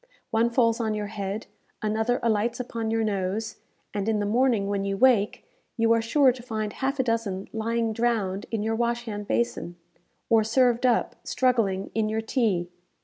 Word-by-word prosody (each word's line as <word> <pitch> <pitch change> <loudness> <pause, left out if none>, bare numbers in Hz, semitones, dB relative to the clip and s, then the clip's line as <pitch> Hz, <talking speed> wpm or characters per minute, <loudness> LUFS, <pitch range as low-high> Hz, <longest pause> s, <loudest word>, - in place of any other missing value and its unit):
One 225 +1 +3
falls 230 -1 +2
on 220 -2 0
your 210 -1 -3
head; 200 +1 -4 0.4
another 220 +3 +1
alights 230 +1 +1
upon 230 -2 -3
your 225 0 +1
nose; 210 +1 -2 0.4
and 205 +1 -1
in 220 - +2
the 205 - -1
morning, 230 -1 +2
when 200 -1 -1
you 195 0 -2
wake, 230 -4 +3 0.3
you 230 0 +3
are 230 - +2
sure 260 +3 +4
to 245 0 -9
find 215 -3 -3
half 270 +1 -2
a - - +4
dozen 225 -5 -2
lying 225 0 -1
drowned 215 -4 -1
in 220 -2 -2
your 225 +1 0
wash 235 +1 -1
hand 205 -2 -5
basin, 205 -7 -1 0.5
or 225 -1 +4
served 245 +2 +3
up, 240 - +1
struggling, 225 -7 +1
in 220 -1 0
your 220 +1 -1
tea. 210 -7 0
225 Hz, 180 wpm, -26 LUFS, 205-235 Hz, 0.5 s, sure